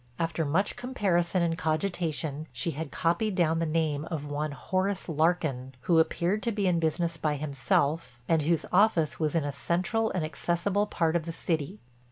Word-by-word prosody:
After 165 -1 -1
much 175 +8 +1
comparison 185 -8 0
and 165 -1 +1
cogitation 155 -3 -2
she 170 - -2
had 160 +1 -5
copied 185 +4 0
down 165 -3 +2
the 165 - 0
name 155 -2 0
of 155 -4 -3
one 145 +1 -2
Horace 185 +6 -1
Larkin, 155 -5 0
who 165 +3 +3
appeared 175 +5 +1
to 235 - 0
be 205 -2 -1
in 175 -2 +3
business 165 +1 0
by 150 -1 0
himself 140 -1 0
and 165 -2 +3
whose 165 +2 +1
office 180 -6 +3
was 155 0 0
in 165 - +2
a 145 - -2
central 185 - 0
and 175 -4 -1
accessible 175 +6 0
part 165 -4 0
of 165 -2 0
the - - -2
city. 160 -7 -2
165 Hz, 180 wpm, -28 LUFS, 155-180 Hz, -, who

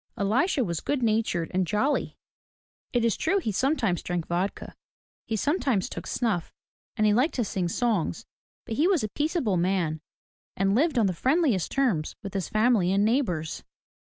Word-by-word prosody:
Elisha 255 - +2
was 170 -6 -3
good 285 -4 -1
natured 215 -7 0
and 185 -1 +1
jolly. 260 - 0 0.7
It 240 -2 +1
is 230 - +2
true 375 +5 +1
he 330 - -1
sometimes 225 - +1
drank 175 -2 -3
vodka, 180 +3 -3 0.5
he 225 - -1
sometimes 265 - 0
took - - -7
snuff 210 -9 -1 0.5
and 215 - +2
he 210 - +4
liked 255 +9 +2
to 240 - 0
sing 185 -2 -2
songs; 195 - -1 0.4
but 225 - -4
he 315 - +4
was 370 - +2
a 215 - -2
peaceable 290 - 0
man 170 -3 0 0.6
and 195 +1 +2
lived 290 +5 +2
on 225 - +4
the 190 - +1
friendliest 260 - +1
terms 225 - 0
with 200 - -6
his 195 -4 -2
family 215 -4 +3
and 200 +1 +3
neighbors. 200 - -1
215 Hz, 170 wpm, -26 LUFS, 185-260 Hz, 0.7 s, he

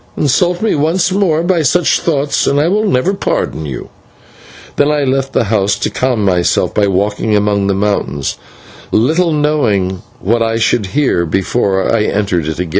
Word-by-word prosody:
Insult 175 +7 +1
me 220 - +2
once 165 +5 +1
more 180 -5 +1
by 175 -1 +1
such 160 +4 +2
thoughts 145 -3 0
and 140 - +2
I 150 - +2
will 210 +4 +1
never 185 +3 +1
pardon 80 - -2
you." 65 -4 -7 0.9
And 145 +1 +2
I 150 -1 0
left 135 0 -1
the - - +2
house 100 -2 +1
to - - -2
calm 125 -5 0
myself 90 -2 +1
by 105 -1 +2
walking 105 +3 0
among 100 -1 +1
the 100 - +1
mountains, 95 -8 -1 0.6
little 160 +9 +2
knowing 110 - 0 0.2
what 115 +4 0
I 115 0 0
should 115 -2 +1
hear 135 -7 +1
before 95 +4 0
I 105 -2 +1
entered 95 -6 -1
it 80 - -3
again. 90 -1 -3
115 Hz, 175 wpm, -14 LUFS, 100-150 Hz, 0.9 s, me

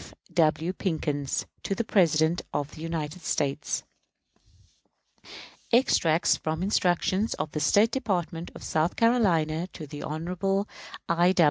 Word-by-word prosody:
F. - - -14 0.2
W. 165 +1 +2
PICKENS. 150 -7 -2 0.2
To 195 - -2
the 230 - -1
President 165 -5 +3
of 145 0 -2
the 155 - -10
United 165 0 -4
States. 145 -1 -1 1.9
_Extracts 175 -9 +3
from 160 +2 -2
instructions 190 +2 +1
of 155 - -4
the 150 - -3
State 205 +9 +4
Department 175 - -2
of - - -10
South 160 +2 0
Carolina 175 -9 +2
to 155 - -7 0.2
Hon. 180 +5 -1 0.4
I. 175 +2 +3
170 Hz, 120 wpm, -27 LUFS, 155-190 Hz, 1.9 s, State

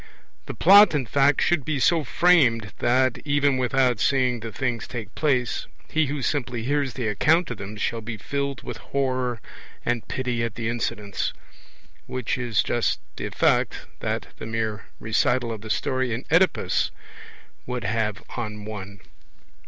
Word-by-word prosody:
The - - -5
Plot 200 -3 +7
in 135 -3 0
fact 140 +4 +3
should 175 -5 +2
be 150 +2 -1
so 165 +4 +3
framed 125 - +3
that, 125 +1 +2
even 145 -2 +2
without 125 -2 +2
seeing 125 -1 +2
the 115 0 -6
things 120 -1 -2
take 120 -3 -7
place, 130 -6 0 0.2
he 160 -2 +2
who 140 -1 -3
simply 125 -5 -1
hears 140 0 0
the 125 -4 -2
account 155 - +2
of 120 - -4
them 100 +2 -7
shall 115 +2 -2
be 110 0 -6
filled 140 +4 -3
with 120 - -6
horror 130 -2 -1 0.5
and 120 -2 -1
pity 125 -3 -2
at 115 -1 -3
the 115 -1 -2
incidents; 105 -3 -2 0.7
which 130 -3 -2
is 120 -5 +1
just 120 -1 0 0.2
the - - -3
effect - - +1
that - - -3
the - - -7
mere 110 -2 -2
recital 115 +2 +1
of 110 -2 -6
the 110 - -9
story 130 +3 0
in 125 - -7
Oedipus 180 +3 +3 0.8
would 125 -1 -3
have 105 0 -1
on 105 -3 -5
one. 100 -2 -8
125 Hz, 160 wpm, -24 LUFS, 115-140 Hz, 0.8 s, Plot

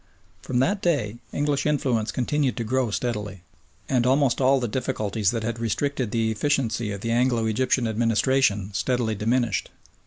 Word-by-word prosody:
From 125 - -3
that 195 +11 +1
day 120 -11 0
English 145 0 0
influence 125 -8 0
continued 130 +2 0
to 120 - -1
grow 130 +1 0
steadily, 105 -5 -3 0.4
and 125 -3 +2
almost 135 0 +2
all 135 +1 +4
the 120 - -1
difficulties 110 -4 -1
that 115 -1 -2
had 115 +1 -3
restricted 130 +2 -1
the 110 0 0
efficiency 115 -3 0
of 100 -1 -5
the 115 - -2
Anglo 120 -1 +2
Egyptian 125 +2 +1
administration 110 -2 +1
steadily 120 +1 0
diminished. 115 +2 0
120 Hz, 155 wpm, -24 LUFS, 110-130 Hz, 0.4 s, all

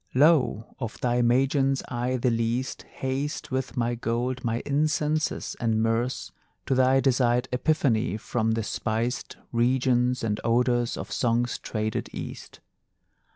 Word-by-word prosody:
Lo, 135 -6 +3
of 115 -4 -5
thy 120 0 +2
Magians 135 +3 +2
I 125 +1 -1
the 125 0 +1
least 115 +3 -1
Haste 135 +3 -3
with 130 +1 -2
my 120 0 +1
gold, 120 +2 -2
my 115 -1 -1
incenses 150 +1 0
and 115 -2 +1
myrrhs, 115 +3 0 0.3
To - - +1
thy 130 +1 +4
desired 125 -2 +2
epiphany, 125 -5 +1
from 110 0 -1
the 115 0 -1
spiced 115 +4 -2
Regions 125 +1 +2
and 105 -2 -1
odorous 120 +1 +2
of - - -6
Song's 120 0 0
traded 110 -1 -3
East. - - -8
125 Hz, 130 wpm, -26 LUFS, 115-130 Hz, 0.3 s, thy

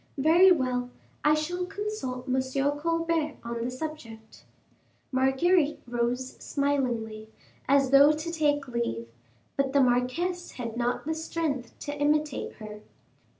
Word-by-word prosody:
Very 335 +7 +6
well, 250 -6 +1 0.3
I 300 0 +5
shall 355 +4 -2
consult 360 -13 -4
M. 260 0 +2 0.4
Colbert 330 -1 0
on 235 0 -4
the 240 - -1
subject." 250 -6 -8 0.7
Marguerite 280 +5 +2
rose 240 +2 -2
smilingly, 240 -7 -1 0.4
as 275 -1 +4
though 280 +2 +8
to 310 +2 -3
take 290 -3 +1
leave, 175 - -3 0.5
but 275 -1 0
the 280 - +4
marquise 265 +9 +1
had 235 -3 -5
not 245 +2 -1
the 320 - -1
strength 315 -6 -3
to 290 - -4
imitate 295 -1 0
her. 210 -1 -10
275 Hz, 125 wpm, -28 LUFS, 245-315 Hz, 0.7 s, though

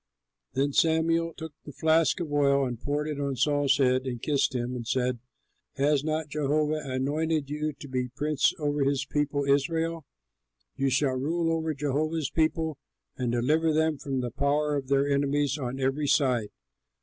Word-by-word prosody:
Then 140 +1 0
Samuel 165 +1 +2
took 160 -2 -7
the 145 - -9
flask 160 +5 +2
of 160 -4 -4
oil 140 -1 +3
and 120 -3 -5
poured 145 +1 -1
it 150 -2 -4
on 140 -1 -1
Saul's 140 +1 +2
head, 130 -1 +2
and 120 -2 -3
kissed 140 0 0
him 125 +1 -2
and 120 -2 -6
said, 125 -1 0 0.6
"Has 140 +1 +2
not 155 0 -1
Jehovah 150 +1 0
anointed 145 +3 -1
you 150 +1 -1
to 140 - -11
be 130 -1 -1
a 125 +2 -24
prince 150 -1 +2
over 145 -2 0
his 140 0 0
people 145 -1 -1
Israel? 160 +3 0 0.7
You 135 0 +1
shall 135 +1 +2
rule 165 +5 0
over 160 -1 -2
Jehovah's 150 +2 -1
people 160 -2 0 0.4
and 125 -2 -2
deliver 150 +7 +2
them 160 -1 +1
from 135 -2 -2
the 120 -1 -3
power 145 +3 +1
of 135 -2 -3
their 140 +1 +2
enemies 140 0 +1
on 130 0 -4
every 135 +3 0
side. 125 -7 +2
145 Hz, 175 wpm, -27 LUFS, 135-155 Hz, 0.7 s, oil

